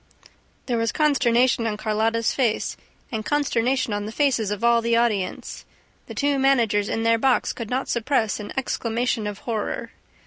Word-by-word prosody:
There 240 -3 -1
was 230 0 0
consternation 245 -5 +2
on 210 -1 -2
Carlotta's 220 +1 0
face 240 -5 0 0.4
and 220 -2 -3
consternation 260 -3 0
on 205 0 -3
the - - -5
faces 240 -5 +1
of 210 +1 -4
all 235 0 +4
the 230 0 +1
audience. 215 -6 -1 0.4
The - - -8
two 285 -1 +1
managers 230 -7 +2
in 225 - -1
their 230 0 +3
box 260 0 +2
could 230 -3 -6
not 260 +2 -1
suppress 235 -2 0
an 205 -1 -7
exclamation 235 -3 -1
of 205 -1 -5
horror. 220 -3 -3
230 Hz, 165 wpm, -23 LUFS, 220-255 Hz, 0.4 s, all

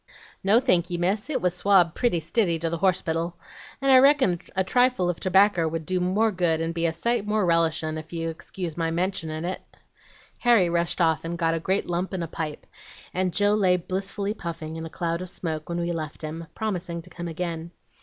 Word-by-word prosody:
"'No, 205 +4 +5
thanky, 175 -6 +1
miss, 195 - 0
it 290 - -1
was 180 -1 +2
swabbed 180 -3 +4
pretty 240 -9 +1
stiddy 170 +2 +1
to 165 0 -2
the 170 - -2
horsepittle, 170 -2 0 0.4
and 275 0 +2
I 260 - +9
reckon 265 - +4 0.2
a 190 - +2
trifle 245 -3 +2
of 170 - -10
tobaccer 190 -2 +3
would 160 0 -3
do 185 +2 0
more 200 +5 +2
good 175 -4 +1
and 165 +1 -2
be 170 0 0
a - - 0
sight 215 +5 -1
more 210 -2 +1
relishin', 160 -2 +1
ef 155 +1 -11
you'll 165 -1 -2
excuse 165 0 -6
my 165 -1 -1
mentionin' 165 -2 -2
it.' 185 - -3 0.8
"Harry 230 -8 +4
rushed 170 +1 0
off 160 -1 +2
and 170 +1 -4
got 165 -1 +1
a 165 - -1
great 190 +4 0
lump 175 +2 -2
and 180 -2 -2
a - - -3
pipe, 155 -2 -5 0.5
and 185 0 0
Joe 205 +3 +2
lay 190 -4 +3
blissfully 195 +3 -3
puffing, 165 -5 -6
in 165 0 -5
a - - -10
cloud 170 +1 -2
of 185 - -6
smoke, 160 -3 -4
when 170 0 -2
we 170 0 -1
left 155 -2 -5
him, 160 +2 -5
promising 180 -6 -3
to 180 - -16
come 175 -1 -6
again. 165 0 -4
175 Hz, 210 wpm, -25 LUFS, 165-190 Hz, 0.8 s, I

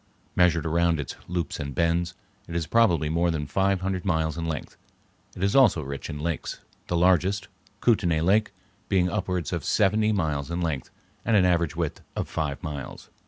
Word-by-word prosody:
Measured 85 -3 +3
around 85 0 +2
its 70 - -4
loops 85 -3 -3
and 70 -2 -5
bends, 85 +1 +1 0.3
it 85 - -7
is 85 -1 0
probably 90 -8 +3
more 85 +3 +1
than 80 -3 -1
five 95 +5 +1
hundred 95 -1 -2
miles 80 -4 0
in 85 0 -3
length. 80 -3 -4 0.6
It 90 - -4
is 100 - +2
also 120 - +5
rich 70 0 -6
in 75 - -4
lakes, 80 +1 -3 0.3
the 85 - 0
largest, 95 +3 +3 0.3
Kootenay 90 -9 +3
Lake, 100 +6 +3 0.4
being 90 -2 +2
upwards 90 -5 -2
of - - -2
seventy 105 +2 +3
miles 75 -8 -1
in 85 +1 -2
length 80 -7 -2 0.3
with 115 - +2
an 95 -3 +5
average 85 -3 +2
width - - -3
of - - -2
five 75 -3 -3
miles. 70 -3 -7
85 Hz, 180 wpm, -26 LUFS, 80-95 Hz, 0.6 s, also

